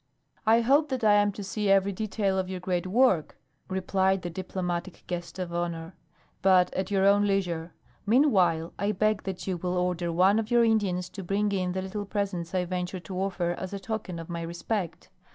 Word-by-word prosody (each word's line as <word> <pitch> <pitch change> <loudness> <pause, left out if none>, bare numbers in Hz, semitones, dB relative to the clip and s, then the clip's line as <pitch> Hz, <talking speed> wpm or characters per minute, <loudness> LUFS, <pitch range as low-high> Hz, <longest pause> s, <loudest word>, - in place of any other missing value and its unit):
"I 225 +1 +6
hope 280 +5 +3
that 260 -3 -2
I 210 -1 +6
am 205 0 +4
to 205 - -7
see 205 +1 -2
every 195 0 +4
detail 200 -1 -1
of 185 -1 -2
your 185 -1 -4
great 180 0 -2
work," 195 - +2 0.3
replied 190 0 +1
the 175 - -4
diplomatic 180 0 -4
guest 175 0 -5
of 180 -2 -4
honor. 170 0 -3 0.5
"But 185 -2 +4
at 190 0 -2
your 195 -1 +2
own 205 +1 +5
leisure. 175 -4 -1 0.3
Meanwhile, 190 - +3
I 205 +1 +1
beg 215 +1 +1
that 190 -2 -5
you 185 -2 -1
will 180 +1 -2
order 180 -1 0
one 190 +5 +4
of 220 -1 -3
your 240 -1 +4
Indians 195 -5 +1
to 195 - -8
bring 200 +3 0
in 185 -2 -1
the 190 0 -2
little 205 +2 -4
presents 195 -4 -3
I 180 -1 +1
venture 180 +1 -3
to 185 0 -6
offer 180 -3 -1
as 185 +2 -5
a 200 - -3
token 195 -3 -4
of 165 -1 -7
my 170 -1 -4
respect. 170 +1 -4
190 Hz, 200 wpm, -27 LUFS, 180-205 Hz, 0.5 s, I